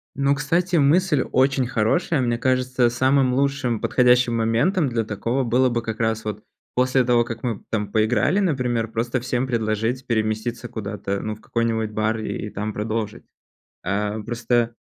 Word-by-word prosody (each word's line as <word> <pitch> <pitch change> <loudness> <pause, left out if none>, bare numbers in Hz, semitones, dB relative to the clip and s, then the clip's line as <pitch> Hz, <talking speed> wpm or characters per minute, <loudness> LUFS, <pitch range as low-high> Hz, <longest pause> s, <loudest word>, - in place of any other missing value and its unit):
Ну, 140 +1 +2
кстати, 170 +6 0
мысль 155 -1 +3
очень 130 0 +2
хорошая, 130 +6 +1
мне 120 -2 0
кажется, 130 0 +1
самым 130 +1 +2
лучшим 135 -4 0
подходящим 125 -1 +3
моментом 120 - +1
для 115 -3 -1
такого 115 +6 -1
было 125 +2 +2
бы 120 -1 -1
как 110 -1 -5
раз 110 -1 0
вот 105 0 -5 0.3
после 130 +1 +3
того, 120 -1 +3
как 115 -1 -7
мы, 115 -5 -3
там, 105 -2 -2
поиграли, 115 - +2
например, 125 - 0
просто 120 +3 -1
всем 125 +1 -1
предложить 115 +1 -1
переместиться 115 +1 -2
куда-то, 100 -3 -4
ну, 110 - -3
в 110 - -19
какой-нибудь 115 -2 -1
бар 110 +1 0
и 110 0 -4
там 105 +2 -4
продолжить. 110 0 -3 0.6
А, 105 +3 -1
просто 120 +1 0
120 Hz, 155 wpm, -22 LUFS, 110-130 Hz, 0.6 s, мысль